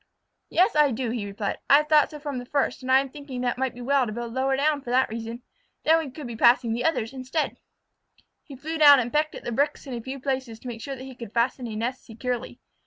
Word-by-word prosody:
"Yes, 370 +4 +3
I 300 -1 +5
do," 245 -1 -2
he 225 -4 -3
replied. 200 0 -3
"I - - +9
have 300 0 0
thought 300 -2 +5
so 300 - -8
from 285 -3 -4
the 245 - -8
first, 280 -1 0
and 260 0 -3
I 265 +1 +7
am 275 - -6
thinking 280 -4 -7
that 245 -1 0
it - - -12
might 265 -2 -1
be 245 - -9
well 270 0 +2
to - - -4
build 235 +1 -5
lower 265 +1 +1
for 285 -2 0
that 255 +2 +3
reason. 230 +2 -6 0.4
Then 320 +1 +5
we 315 -4 -4
could 280 +2 -9
be 235 -1 -6
passing 235 0 +4
the 240 +2 -2
others 270 -8 0
instead." 265 +4 -2 0.9
He 280 - -11
flew 315 +5 -5
down 290 -2 +9
and 240 -1 -3
pecked 305 +1 +1
at - - -9
the - - -4
bricks 285 +6 0
in 270 - -6
a 235 - -4
few 265 +3 -6
places 260 -4 -3
to - - -9
make 230 -2 -6
sure 275 +2 -5
that 260 - -9
he 265 0 -9
could 235 -3 -10
fasten 245 +1 0
a 220 - -6
nest 240 +4 -3
securely. 245 +1 -5
260 Hz, 265 wpm, -25 LUFS, 235-285 Hz, 0.9 s, I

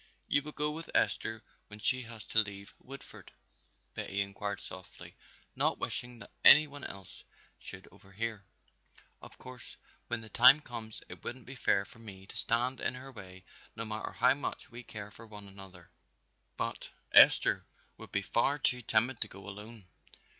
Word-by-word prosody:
"You 145 - +3
will 150 +1 -8
go 150 0 -1
with 165 +2 -7
Esther 110 -1 +1 0.2
when 105 - -11
she 130 +4 +1
has 115 -1 -10
to 115 - +2
leave 100 -2 -3
Woodford?" 135 +1 -12 0.6
Betty 100 +1 -2
inquired 100 0 -3
softly, 95 -1 -10 0.4
not - - +1
wishing 120 0 -1
that - - -12
any 150 +1 +10
one 145 -2 -11
else 95 -2 -9 0.4
should 95 - -8
overhear. 100 +2 -5 0.8
"Of - - -13
course 130 -1 -10 0.3
when 120 -1 -2
the 110 - -11
time 125 +6 +8
comes 115 -6 -6
it - - -11
wouldn't 130 -1 -6
be 130 - -8
fair 100 -6 +2
for 100 - -17
me 95 -4 -11
to - - -12
stand 125 +3 +1
in - - -1
her 130 +2 -9
way 95 -6 -11 0.3
no 115 +1 -3
matter 110 0 -4
how 125 +2 +5
much 140 -1 -5
we 120 +1 -8
care 105 -3 -8
for 115 +2 -13
one 105 -2 -10
another, 95 -3 -13 0.7
but - - -3 0.2
Esther - - +7 0.3
would - - -11
be 100 - 0
far 125 +8 +2
too 125 -3 +1
timid 115 +2 +2
to - - +5
go 100 +1 -12
alone." 105 +1 -9
110 Hz, 170 wpm, -32 LUFS, 100-125 Hz, 0.8 s, any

